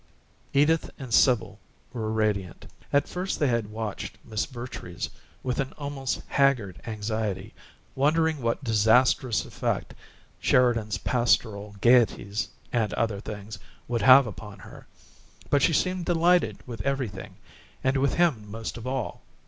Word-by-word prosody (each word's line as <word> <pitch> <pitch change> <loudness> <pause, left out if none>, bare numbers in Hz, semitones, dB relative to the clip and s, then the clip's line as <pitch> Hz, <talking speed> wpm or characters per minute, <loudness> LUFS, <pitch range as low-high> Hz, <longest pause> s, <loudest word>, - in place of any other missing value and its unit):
Edith 150 +3 +3
and 130 -5 -7
Sibyl 105 -7 +3 0.3
were 110 -3 -3
radiant: 105 -5 -1 0.3
at 140 0 +3
first 185 +2 -3
they 145 - +2
had 115 -3 0
watched 110 -1 -5
Miss 110 -1 -2
Vertrees 120 -8 -6 0.3
with 125 -1 -2
an 135 -1 -2
almost 140 -2 -3
haggard 125 -10 +1
anxiety, 110 -2 -3 0.4
wondering 155 +2 +2
what 115 +3 -1
disasterous 115 +1 +3
effect - - -3 0.5
Sheridan's 115 -4 +2
pastoral 110 -4 0
gaieties 115 -4 +3 0.3
and 115 -3 +1
other 110 -3 -1
things 105 0 -7 0.3
would 120 -1 -1
have 130 +5 +8
upon 105 -1 -8
her, 95 - -13 0.6
but 145 - +4
she 165 - +4
seemed 185 +2 0
delighted 175 +1 +3
with 120 -3 -6
everything, 130 -9 -3 0.5
and 130 +1 +2
with 135 +1 +1
him 140 -12 +1
most 115 +2 -6
of 115 +2 -7
all. 130 -2 -3
120 Hz, 130 wpm, -26 LUFS, 105-135 Hz, 0.6 s, have